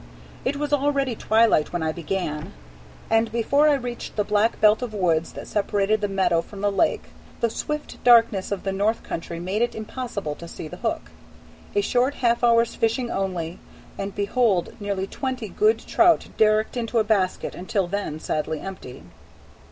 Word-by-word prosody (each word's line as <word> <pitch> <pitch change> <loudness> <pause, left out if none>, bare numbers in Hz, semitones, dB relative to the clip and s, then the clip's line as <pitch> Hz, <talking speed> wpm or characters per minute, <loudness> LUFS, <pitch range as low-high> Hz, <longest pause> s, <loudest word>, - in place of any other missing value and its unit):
It 285 - 0
was 295 0 -2
already 275 -3 +1
twilight 220 -8 +3
when 175 -2 -2
I 160 - 0
began, 160 -2 -4 0.5
and 225 0 +2
before 280 +6 +3
I 290 - +4
reached 245 -3 -5
the 210 - +1
black 210 +2 +1
belt 215 +1 +5
of 235 -4 -4
woods 170 -4 +1
that - - -8
separated 205 0 +1
the 205 - +1
meadow 190 -4 +2
from 195 +3 -11
the 205 0 +2
lake, 315 +11 +1 0.4
the 235 - +1
swift 300 +5 -5
darkness 230 -6 +5
of 200 - -2
the 195 - -1
North 205 +4 0
Country 165 0 -5
made 190 +5 -2
it 240 - 0
impossible 220 - -4
to 170 +3 -10
see 160 - -8
the 180 - -9
hook. 225 +1 -3 0.6
A 410 - +4
short 260 -5 +1
half 235 -1 +1
hour's 235 -1 +4
fishing 235 +2 0
only, 180 -3 -3 0.4
and 195 0 -5
behold 205 -2 +1
nearly 200 -2 -2
twenty 255 0 -4
good 430 - +3
trout 345 -1 +3
derricked 215 +1 +3
into 235 -1 -2
a 220 - +4
basket 200 -4 0
until 185 +2 -1
then 180 -4 -3
sadly 155 0 -2
empty. 185 -9 -8
215 Hz, 175 wpm, -24 LUFS, 190-240 Hz, 0.6 s, belt